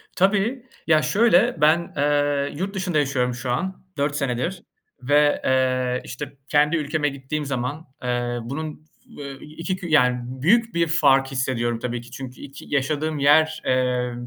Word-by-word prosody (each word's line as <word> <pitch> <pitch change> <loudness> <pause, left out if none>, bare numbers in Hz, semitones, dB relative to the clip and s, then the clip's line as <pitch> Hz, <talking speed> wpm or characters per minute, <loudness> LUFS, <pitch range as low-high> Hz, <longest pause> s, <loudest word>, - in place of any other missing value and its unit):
Tabii, 210 +7 +1 0.2
ya 155 -1 +5
şöyle, 205 -3 +3
ben, 165 +3 +3
eee, 145 0 +1
yurt 195 +3 -3
dışında 185 -4 -1
yaşıyorum 135 -4 +1
şu 125 0 -4
an, 190 +10 -3
4 145 0 0
senedir 145 +7 -2 0.4
ve, 145 +3 +3
eee, 130 -1 +1
işte, 140 +2 -7
kendi 150 +3 +3
ülkeme 150 -1 0
gittiğim 140 +2 -4
zaman, 135 +4 -3 0.2
eee, 120 -1 -1
bunun, 155 +5 -6 0.3
f 145 - -7
ve 135 -1 -8
2 165 +5 -4
kü 180 -1 -7
yani 125 -6 +3
büyük 190 - +1
bir 170 0 +2
fark 140 -5 +4
hissediyorum 120 -3 -1
tabii 120 0 -3
ki. 120 +1 -15
Çünkü 130 0 -8
2 140 0 -10
yaşadığım 150 +2 -1
yer, 155 +3 +4
eee, 125 -1 +1
145 Hz, 155 wpm, -23 LUFS, 130-160 Hz, 0.4 s, ya